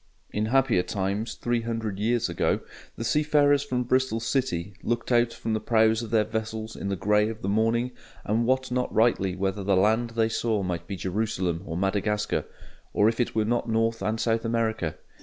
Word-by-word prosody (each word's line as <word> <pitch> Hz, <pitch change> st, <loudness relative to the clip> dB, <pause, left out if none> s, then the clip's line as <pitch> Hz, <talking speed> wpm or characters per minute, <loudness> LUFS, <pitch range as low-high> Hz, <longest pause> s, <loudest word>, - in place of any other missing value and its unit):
In 105 Hz, +1 st, -1 dB
happier 130 Hz, -5 st, +3 dB
times, 100 Hz, +4 st, -2 dB
three 120 Hz, -1 st, -1 dB
hundred 115 Hz, -4 st, -3 dB
years 115 Hz, +2 st, +1 dB
ago, -, -, 0 dB, 0.3 s
the -, -, -5 dB
seafarers 145 Hz, +2 st, +3 dB
from 125 Hz, -3 st, -1 dB
Bristol 130 Hz, -2 st, +1 dB
City 115 Hz, -6 st, -1 dB
looked 120 Hz, +1 st, -2 dB
out 120 Hz, -1 st, +4 dB
from 115 Hz, -, -3 dB
the 110 Hz, -, +1 dB
prows 110 Hz, 0 st, +3 dB
of 115 Hz, -, -6 dB
their 110 Hz, -1 st, +3 dB
vessels 110 Hz, 0 st, -4 dB
in 100 Hz, -, -4 dB
the 100 Hz, -, 0 dB
grey 105 Hz, +3 st, +2 dB
of 110 Hz, 0 st, -8 dB
the -, -, -2 dB
morning, 115 Hz, +4 st, +1 dB, 0.3 s
and 115 Hz, +3 st, +1 dB
wot 130 Hz, 0 st, +1 dB
not 125 Hz, 0 st, 0 dB
rightly 105 Hz, -5 st, +2 dB
whether 95 Hz, +1 st, -2 dB
the 95 Hz, -1 st, +2 dB
land 110 Hz, +5 st, +3 dB
they 115 Hz, -1 st, +3 dB
saw 110 Hz, -2 st, 0 dB
might 85 Hz, -2 st, -3 dB
be 100 Hz, -, -4 dB
Jerusalem 95 Hz, -3 st, -1 dB
or 80 Hz, -, -3 dB
Madagascar, 105 Hz, +2 st, 0 dB, 0.5 s
or 105 Hz, +2 st, +4 dB
if 115 Hz, -, -4 dB
it 120 Hz, -, 0 dB
were 110 Hz, -1 st, +2 dB
not 120 Hz, +1 st, 0 dB
North 115 Hz, 0 st, +1 dB
and 110 Hz, +3 st, -1 dB
South 115 Hz, 0 st, +1 dB
America. 110 Hz, -8 st, -1 dB
110 Hz, 195 wpm, -26 LUFS, 105-120 Hz, 0.5 s, out